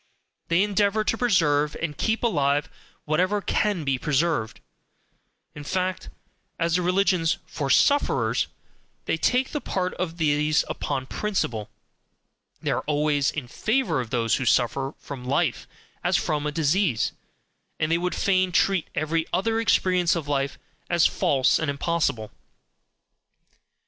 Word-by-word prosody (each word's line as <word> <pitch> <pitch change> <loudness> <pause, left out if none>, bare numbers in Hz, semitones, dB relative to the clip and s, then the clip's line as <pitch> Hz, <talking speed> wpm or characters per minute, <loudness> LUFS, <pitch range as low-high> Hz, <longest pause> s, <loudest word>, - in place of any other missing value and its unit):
They 170 +3 +3
endeavour 205 +1 +1
to 220 - 0
preserve 150 -11 +2
and 155 -3 -3
keep 220 +9 -1
alive 145 -8 +1 0.4
whatever 185 +7 +1
can 200 -3 0
be 135 -2 0
preserved; 150 -5 0 0.9
in 150 - -9
fact, 185 +4 -2 0.5
as 165 0 +1
the 180 - +2
religions 180 -2 +2
FOR 140 -3 -4
SUFFERERS, 285 - +3 0.6
they - - +1
take 255 +1 +1
the 295 - -3
part 185 -1 -2
of 170 -2 -3
these 150 -1 +2
upon 130 -1 -3
principle; 130 - -2 0.9
they - - 0
are - - 0
always 145 -1 +1
in 145 -5 -5
favour 215 - 0
of 120 - -7
those 115 -1 +1
who 130 - -3
suffer 135 +4 +1
from 135 -3 -8
life 140 +2 0 0.4
as - - +2
from 150 -1 -1
a - - -1
disease, 155 - +1 0.7
and 155 - 0
they 170 - +3
would 180 +1 -2
fain 185 -2 +2
treat 190 0 +2
every 160 +1 -1
other 225 +5 0
experience 185 -6 +2
of 160 -4 -4
life 140 -1 -1 0.3
as 175 -2 +3
false 135 -2 +2
and 160 - -1
impossible. 140 -6 -1
160 Hz, 140 wpm, -25 LUFS, 145-185 Hz, 0.9 s, They